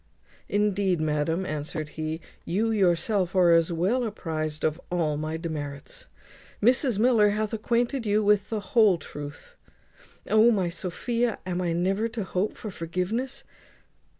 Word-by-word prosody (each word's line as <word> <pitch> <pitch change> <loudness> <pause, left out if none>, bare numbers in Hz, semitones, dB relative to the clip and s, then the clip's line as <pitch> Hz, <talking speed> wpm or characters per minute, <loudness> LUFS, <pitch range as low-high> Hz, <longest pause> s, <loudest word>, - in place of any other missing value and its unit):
"Indeed, 200 -3 +1
madam," 155 +4 0
answered 155 -2 -4
he, 155 +1 -4 0.2
"you 215 +6 0
yourself 190 -1 +1
are 180 -2 +5
as 165 +1 +4
well 190 +10 +1
apprized 155 -8 -4
of 155 +2 0
all 165 -4 0
my 155 +2 -3
demerits. 160 - -6 0.5
Mrs 245 0 +3
Miller 220 -2 +4
hath 210 +1 -1
acquainted 235 +3 0
you 210 +1 +2
with 205 -1 +3
the 220 -2 -2
whole 215 -6 +6
truth. 145 - -9 0.7
O! 220 +2 +5
my 195 -6 +1
Sophia, 225 +7 -2
am 180 -1 -2
I 175 -2 0
never 195 +6 +1
to 225 -2 -4
hope 190 +2 -2
for 215 - -6
forgiveness?" 200 +11 -3
190 Hz, 140 wpm, -26 LUFS, 165-220 Hz, 0.7 s, whole